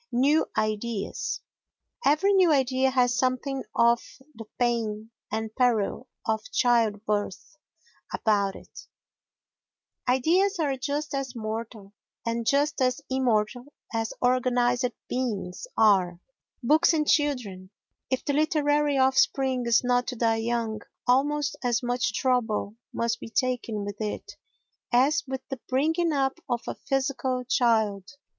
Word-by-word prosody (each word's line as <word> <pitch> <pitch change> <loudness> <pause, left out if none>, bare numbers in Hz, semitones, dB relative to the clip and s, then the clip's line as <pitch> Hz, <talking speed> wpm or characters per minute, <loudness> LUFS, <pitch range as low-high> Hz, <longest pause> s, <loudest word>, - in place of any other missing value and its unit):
New 280 +6 +3
Ideas 215 0 -2 0.6
Every 380 +8 +3
new 370 -4 +5
idea 265 -2 +2
has 250 -2 +2
something 260 +1 -1
of 235 0 +4 0.3
the 225 -2 -10
pain 225 -3 -1 0.2
and 220 0 -3
peril 245 -1 +1 0.2
of 220 -1 0
childbirth 215 -2 0 0.6
about 200 -3 +1
it; - - -13 1.2
ideas 350 +11 +3
are 290 -5 0
just 285 +3 -3
as 270 -2 -3
mortal 220 -2 -6 0.3
and 230 0 -2
just 290 +1 +2
as 255 +2 +1
immortal 245 -2 +1 0.3
as 225 -1 -1
organised 245 0 +2 0.2
beings 225 - -3
are. 185 -5 +4 0.4
Books 310 +7 +4
and 305 -2 +1
Children 240 -11 0 0.4
If 260 -1 -1
the 285 - 0
literary 295 -1 +2
offspring 265 -1 +2
is 235 +1 +4
not 245 0 +1
to 250 - -3
die 225 -1 +1
young, 225 -1 -2 0.2
almost 280 +2 +2
as 245 0 +1
much 240 -4 -1
trouble 225 -5 0 0.2
must 230 0 -1
be - - -8
taken 230 -4 -1
with 205 +1 -6
it 210 -1 -4 0.6
as 280 +4 +3
with 265 0 -5
the 270 - -5
bringing 320 +6 +1
up 275 +1 0
of 240 -1 -1
a - - -2
physical 270 -2 -1
child. 220 -6 +1
245 Hz, 125 wpm, -26 LUFS, 225-270 Hz, 1.2 s, new